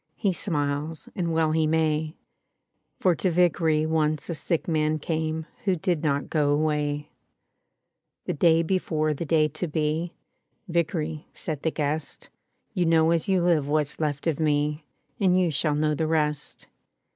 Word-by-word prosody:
He 195 -3 0
smiles, 150 -3 -2
and 170 -3 -1
well 160 -1 +2
he 160 0 +2
may; 155 0 0 0.8
For 185 - +3
to 185 - 0
Vickery 165 -3 +2
once 155 0 0
a - - -1
sick 165 +1 -2
man 155 -1 +1
came 160 0 -2 0.2
Who 190 -2 +3
did 175 -2 -1
not 145 -3 0
go 150 -3 +1
away/ 150 0 0 1.1
The - - -1
day 165 +2 +4
before 160 -3 0
the 160 +4 -4
day 155 0 +3
to 155 +5 -4
be, 155 +2 -1 0.5
"Vickery/' 165 -2 -1
said 155 -4 -5
the 160 - +1
guest, 150 -1 -3 0.4
"You 175 -2 +1
know 165 0 +4
as 170 +2 +1
you 190 -2 +3
Uve 165 -5 +3
what's 150 0 0
left 150 -3 -2
of 165 -3 0
And 150 0 +1 0.6
you 175 -3 +2
shall 150 +1 +1
know 150 0 +1
the 155 +1 -1
rest. 150 -2 -1
155 Hz, 155 wpm, -26 LUFS, 150-165 Hz, 1.1 s, day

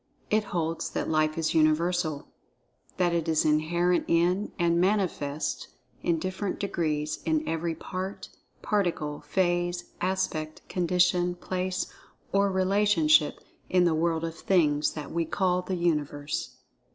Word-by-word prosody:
It 215 0 +3
holds 165 -1 -2
that - - -2
Life 155 0 +1
is 160 -1 0
Universal—that 165 +2 -1
it 170 -1 0
is 160 -1 +2
inherent 170 +3 +2
in, 175 +4 +2
and 170 -1 +2
manifests 180 -7 -1 0.3
(in 170 -1 +1
different 185 +3 -3
degrees) 155 -5 -1
in 155 -1 0
every 165 0 -1
part, 185 +4 -6 0.3
particle, 170 -8 -1
phase, 175 -1 -1
aspect, 170 -4 -2
condition, 180 0 +2
place, 185 +1 -2 0.5
or 200 0 +3
relationship, 185 -5 +3 0.3
in 180 -1 +4
the 170 -2 +3
World 165 0 0
of 165 0 -3
Things 155 -4 +2
that 150 -2 -7
we 170 0 0
call 180 +2 +1
the 185 +1 -3
Universe. 150 -4 -1
170 Hz, 125 wpm, -27 LUFS, 155-185 Hz, 0.5 s, in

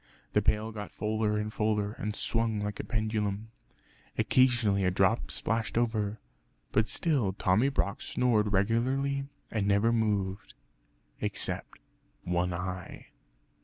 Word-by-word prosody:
The - - +4
pail 110 +1 +1
got 105 -1 -7
fuller 105 0 0
and 105 +1 -3
fuller, 105 -1 +1
and 105 0 -4
swung 115 -2 0
like 105 0 -3
a - - -2
pendulum. 110 -1 -2 0.7
Occasionally 120 -6 +3
a 90 - +4
drop 95 +5 +2
splashed 115 0 -1
over; 110 -3 0 0.5
but 110 +1 +3
still 135 - +1
Tommy 100 +7 +3
Brock 105 -7 -1
snored 110 -5 +1
regularly 130 +7 +1 0.3
and 105 -3 0
never 100 +3 +3
moved, 100 -4 -1 0.6
except - - -3 0.5
one 90 +1 0
eye. 90 +1 -5
105 Hz, 125 wpm, -30 LUFS, 100-115 Hz, 0.7 s, The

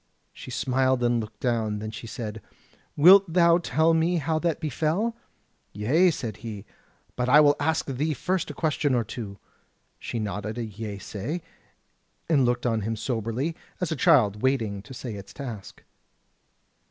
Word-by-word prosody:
She - - -10
smiled 130 -1 +1
and 120 0 +2
looked 110 -1 -7
down: 115 -4 0
then 110 +1 -5
she 115 - -8
said: 110 -1 -6 0.6
"Wilt 185 +4 +7
thou 170 0 +5
tell 165 -1 +2
me 165 +2 +2
how 160 +1 0
that 165 -1 -1
befell?" 165 - -1 0.6
"Yea," 140 - +3
said 115 - -4
he, 105 -2 -7 0.5
"but 125 0 -1
I 145 +4 +8
will 145 -1 +6
ask 160 +2 0
thee 145 +3 -1
first 180 +6 -1
a 150 - -7
question 150 -3 0
or 120 - +2
two." 105 -2 -7 0.6
She - - -5
nodded 105 +1 -4
a 120 - -2
yeasay, 110 - -5 0.8
and 145 -6 +3
looked 120 +1 0
on 115 -2 +1
him 110 +3 -2
soberly, 115 +6 -2 0.2
as 180 -2 -2
a - - 0
child 125 - +4
waiting 115 -7 0
to 110 - -12
say 120 -2 -6
its 100 -1 -9
task. 120 -9 -8
125 Hz, 160 wpm, -26 LUFS, 110-160 Hz, 0.8 s, I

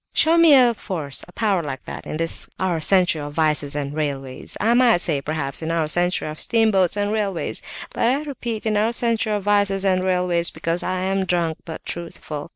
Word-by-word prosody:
Show 320 +1 +4
me 325 -3 +7
a 245 -3 +5
force, 160 -10 -4
a - - -15
power 200 -3 0
like 135 -4 -6
that, - - -8
in - - -4
this 165 0 -1
our 180 -3 0
century 175 -1 +3
of 145 0 -7
vices 150 -2 +1
and 145 -1 -3
railways! 140 -4 -3
I 225 +3 +2
might 240 -4 +5
say, 155 -6 0
perhaps, 145 -1 -2
in 160 - -3
our 165 -2 0
century 175 +2 0
of 155 0 -4
steamboats 210 -5 +2
and 205 0 0
railways, 205 -5 -2 0.3
but - - +1
I 270 +5 +1
repeat 240 -7 -5
in 215 -1 +1
our 220 +3 +1
century 230 -2 +1
of 205 -2 -2
vices 200 -1 +2
and 185 -1 +2
railways, 180 -2 +1
because 165 +2 -2
I 185 0 -2
am 190 +1 0
drunk 170 -2 -1
but 160 - -8
truthful! 165 -3 -6
180 Hz, 205 wpm, -22 LUFS, 160-210 Hz, 0.3 s, me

